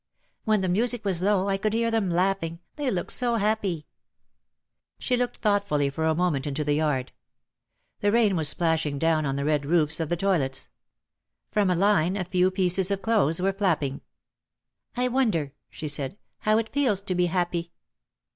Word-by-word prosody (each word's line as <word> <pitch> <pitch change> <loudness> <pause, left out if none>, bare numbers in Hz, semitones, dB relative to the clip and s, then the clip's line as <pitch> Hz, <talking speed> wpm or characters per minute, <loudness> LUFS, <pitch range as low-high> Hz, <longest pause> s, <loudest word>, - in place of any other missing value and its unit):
When 215 -3 +2
the 190 - -1
music 225 +4 0
was 185 -3 +2
low 195 0 +2
I 195 -1 +1
could 215 +1 -1
hear 230 0 +1
them 220 -4 0
laugh 190 +3 +1
ing, 165 0 -5 0.2
they 290 -3 -1
looked 180 -6 -2
so 240 -2 0
happy 205 -7 -1 0.6
!" - - -60 0.3
She 250 - 0
looked 245 0 -2
thoughtfully 200 -10 +1
for 160 +3 -2
a 160 0 +2
moment 155 -5 0
into 145 +1 -2
the 145 0 0
yard. 145 -4 0 0.9
The 205 - +1
rain 215 -4 +3
was 155 -3 +3
splashing 160 -4 0
down 155 -1 +1
on 135 - -1
the 140 0 -2
red 150 -1 +1
roofs 155 +1 +1
of 160 -2 -2
the 175 - 0
toilets. 165 -8 0 0.8
From 205 -3 +2
a 180 - +2
line 195 -1 +2
a 185 - -2
few 180 0 +2
pieces 185 0 +2
of 195 -1 -2
clothes 185 -8 +2
were 195 +2 +1
flap 190 -6 +1
ping. 140 -1 -4 1.0
"I 250 0 +2
wonder," 215 - 0 0.2
she 155 - -6
said, 145 +4 -2 0.2
"how 215 0 +2
it 225 0 -1
feels 250 -9 +1
to 195 - -2
be 180 0 +1
happy!" 175 -1 -2
180 Hz, 190 wpm, -26 LUFS, 155-205 Hz, 1.0 s, rain